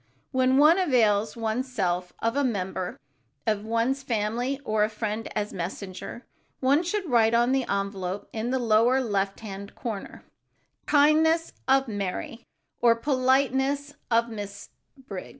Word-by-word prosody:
When 260 0 +3
one 310 +6 +6
avails 225 - +2
one's 230 +3 -2
self 180 -5 -1
of 230 +2 +1
a 285 - +2
member 190 -6 -2 0.5
of 210 -1 0
one's 230 +5 0
family 240 +2 -1
or 215 -2 +2
a 210 - +1
friend 215 0 -3
as 210 -1 -2
messenger, 190 +6 -6 0.3
one 275 +4 +3
should 370 +2 -2
write 230 -4 +4
on 240 +2 +3
the 265 -1 0
envelope 195 -1 -2
in 225 +2 -2
the 260 - +1
lower 235 +2 +3
left 200 -5 -1
hand 200 -1 -8
corner, 220 -5 -6 0.6
"Kindness 315 +3 +4
of 270 0 +4
Mary" 205 +3 -4 0.3
or 235 -1 +5
"Politeness 265 +2 +1 0.2
of 230 0 +3
Miss 205 -3 -7 0.3
Briggs." 205 -9 -8
230 Hz, 140 wpm, -26 LUFS, 205-265 Hz, 0.6 s, one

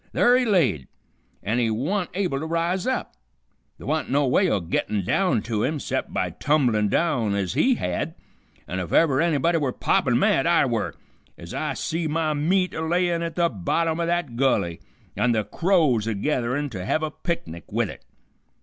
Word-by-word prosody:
Ther' 245 +1 +5
he 255 0 +2
laid, 155 - +2 0.6
and 110 +4 0
he 115 -2 +2
wa'n't 165 - -1
able 180 -8 -1
to 160 - -4
rise 170 +5 -1
up. 260 - -2 0.6
Th' - - -13
wa'n't 155 +3 -1
no 145 +2 +2
way 180 +8 +3
o' 105 - +1
gettin' 95 +3 -2
down 160 - +1
to 110 -3 -2
him 150 +5 -1
'cept - - -3
by - - -1
tumblin' 120 -9 +1
down 120 -11 +1
ez 95 -3 -1
he 260 0 +3
had, 90 - -3 0.5
an' 95 - -3
if 90 - -5
ever 145 -4 +4
anybody 165 0 +2
were 140 -4 0
poppin' - - +1
mad - - +2
I - - +4
were, - - -2 0.4
ez - - -9
I - - -2
see 165 0 -2
my 155 0 0
meat 180 +5 +1
a - - -4
layin' 170 +1 +1
at 165 -1 -4
the 170 -1 +3
bottom 160 - -1
o' 170 - 0
that 170 -8 -1
gulley, 100 -10 +1 0.4
an' 125 -1 +2
the 110 -1 +1
crows 155 - +1
a 115 - -1
getherin' 130 +4 -1
to 95 -4 -5
hev 155 +11 0
a 155 - -2
picnic 85 - -5
with - - 0
it. - - -13
150 Hz, 190 wpm, -24 LUFS, 115-170 Hz, 0.6 s, Ther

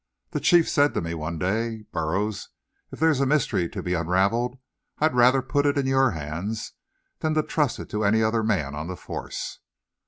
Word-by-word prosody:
The - - -1
Chief 170 -2 +4
said 145 0 +2
to - - +1
me 85 0 -4
one 80 +1 -4
day: 110 +6 -1
"Burroughs, 95 +6 -2 0.4
if - - -9
there's 160 -4 +3
a 140 - +3
mystery 130 - +1
to - - -6
be 90 - -1
unravelled; 100 +9 +1 0.4
I'd 155 -1 +2
rather 125 +2 +5
put 145 +2 +1
it 145 - +1
in 140 - +1
your 135 0 +3
hands 85 +6 -4 0.5
than 155 -1 0
to 155 - +3
trust 150 -5 0
it - - -9
to 105 0 -1
any 110 +2 +3
other 110 +1 +2
man 75 -11 0
on 75 +3 -5
the 90 0 -5
force. - - -6
110 Hz, 195 wpm, -25 LUFS, 90-135 Hz, 0.5 s, rather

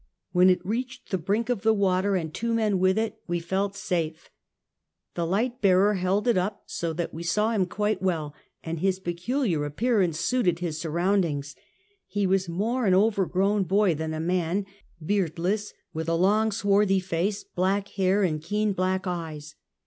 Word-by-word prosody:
When 180 +1 +5
it 180 -1 +2
reached 250 +5 -4
the 190 - 0
brink 205 +7 0
of 245 -5 -1
the 220 +1 +3
water, 195 0 +2
and 160 -4 -2
two 230 +4 -1
men 210 -4 +1
with 185 +2 +3
it, 225 0 -1
we 175 -1 -1
felt 195 +4 -2
safe. 165 -5 -3 0.8
The 170 -1 -2
light 235 +7 -1
bearer 195 +1 +4
held 195 +4 0
it 230 -6 +4
up 200 +3 -3
so 170 -1 -3
that 170 +1 -3
we 160 - -6
saw 210 +6 +1
him 195 -5 +1
quite 210 0 -1
well, 160 -6 -1 0.3
and 165 0 -4
his 190 +1 +1
pecu 190 +11 -2
liar 160 -6 0
appearance 180 +1 +1
suited 180 -3 +1
his 170 -3 -4
surroundings. 165 -4 0 0.5
He 205 -1 -1
was 190 -1 +1
more 220 +7 0
an 185 - +5
overgrown 200 -1 +2
boy 195 0 +3
than 160 +1 -3
a - - -4
man, 180 +3 0 0.4
beardless, 195 +2 0 0.2
with 160 +1 -3
a 165 - +2
long 210 +5 +3
swarthy 200 -1 +2
face, 190 +2 -2
black 195 +2 -1
hair 195 +1 +1
and 155 -5 0
keen 210 +5 0
black 185 +1 -1
eyes. 160 -4 -5
190 Hz, 175 wpm, -26 LUFS, 170-205 Hz, 0.8 s, When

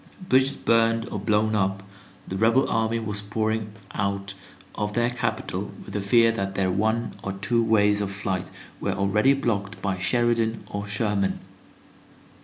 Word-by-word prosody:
Bridges 130 +2 +3
burned 115 0 +2
or 105 - -3
blown 105 +2 +1
up, 95 -2 0 0.4
the 95 - -4
rebel 115 +6 +3
army 115 0 +1
was 105 -2 -3
pouring 110 +1 -1 0.2
out 100 -1 -2 0.4
of 105 -1 -3
their 120 +2 +1
capital 110 -5 -3 0.2
with - - -9
the 100 - -1
fear 115 +3 +5
that 95 -3 -3
their 95 -1 +1
one 110 +4 0
or 100 - -4
two 115 +5 +1
ways 105 -2 +3
of 100 - -1
flight 100 -2 -3 0.3
were - - -1
already 105 +7 +3
blocked 105 -6 -2
by 95 -1 -2
Sheridan 115 +2 +1
or 100 0 -5
Sherman. 100 -1 0
105 Hz, 155 wpm, -25 LUFS, 100-115 Hz, 0.4 s, fear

